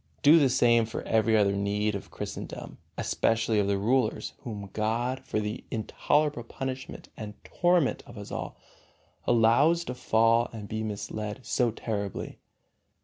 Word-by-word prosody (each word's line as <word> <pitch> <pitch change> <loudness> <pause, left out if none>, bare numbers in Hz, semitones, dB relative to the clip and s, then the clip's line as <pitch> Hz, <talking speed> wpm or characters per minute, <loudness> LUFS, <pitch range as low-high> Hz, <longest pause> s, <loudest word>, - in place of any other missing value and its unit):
Do 155 +3 +8
the 140 -3 +4
same 120 -2 +4
for 115 - -5
every 110 0 +3
other 100 -2 +4
need 105 +1 0
of 100 - -6
Christendom, - - -7 0.2
especially 115 -1 +1
of 100 - +1
the 100 0 +1
rulers, 115 +3 +1
whom 100 -5 -7
God, 120 +4 0
for - - -2
the 105 0 -4
intolerable 145 +5 0
punishment 130 +2 -6
and 105 -1 -7
torment 175 -5 +2
of 120 - -12
us 100 - -8
all, - - -5 0.7
allows 130 +9 +4
to 125 - -4
fall 115 -1 +3
and 110 -3 -7
be 110 +1 -3
misled 105 +2 -4
so 120 +2 +2
terribly. 105 -3 -4
115 Hz, 145 wpm, -28 LUFS, 105-125 Hz, 0.7 s, Do